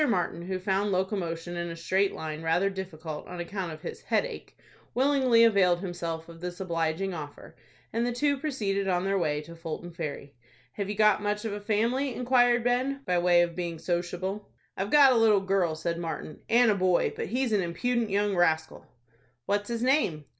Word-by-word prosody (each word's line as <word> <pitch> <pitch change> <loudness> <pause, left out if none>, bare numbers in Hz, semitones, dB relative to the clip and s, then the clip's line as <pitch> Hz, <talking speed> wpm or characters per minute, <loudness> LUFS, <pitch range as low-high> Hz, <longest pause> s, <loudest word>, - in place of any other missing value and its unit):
Martin, 175 -5 0
who 185 +2 -3
found 195 +2 0
locomotion 180 -3 -2
in 170 0 -3
a 165 - -6
straight 190 +4 +1
line 155 0 -6
rather 175 +5 +1
difficult 165 -5 -6
on 180 0 -7
account 180 0 -4
of 155 0 -10
his - - -6
headache, - - -2 0.4
willingly 260 -3 +4
availed 190 -6 +4
himself 170 -3 -5
of 165 0 -13
this 180 0 -5
obliging 170 +1 -1
offer, 150 -3 -9 0.4
and 230 - 0
the 245 - 0
two 285 +4 +1
proceeded 215 -9 -2
on 180 0 +1
their 195 0 +1
way 150 -3 0
to 165 +2 -11
Fulton 165 +1 -6
Ferry. 145 -3 -6 0.4
"Have 200 -1 -4
you 210 - -2
got 215 0 +4
much 210 +1 -2
of 220 - -2
a 205 - -4
family?" 235 +5 0
inquired 245 -1 +3
Ben, 255 +3 0
by 180 -1 +1
way 175 0 +5
of 170 -1 -3
being 170 -2 -3
sociable. 180 +4 -3 0.3
"I've 195 +2 -3
got 280 0 +7
a - - +2
little 220 -3 +5
girl," 190 -4 0
said 170 +1 -3
Martin, 165 -2 -5
"and 235 -1 +5
a - - +2
boy, 185 -2 +2
but - - -4
he's 250 +3 -1
an 210 -2 +3
impudent 225 +7 -1
young 200 0 +1
rascal." 160 -2 0 0.6
"What's 205 +1 -1
his 235 0 -2
name?" 250 - +1
190 Hz, 190 wpm, -28 LUFS, 170-225 Hz, 0.6 s, got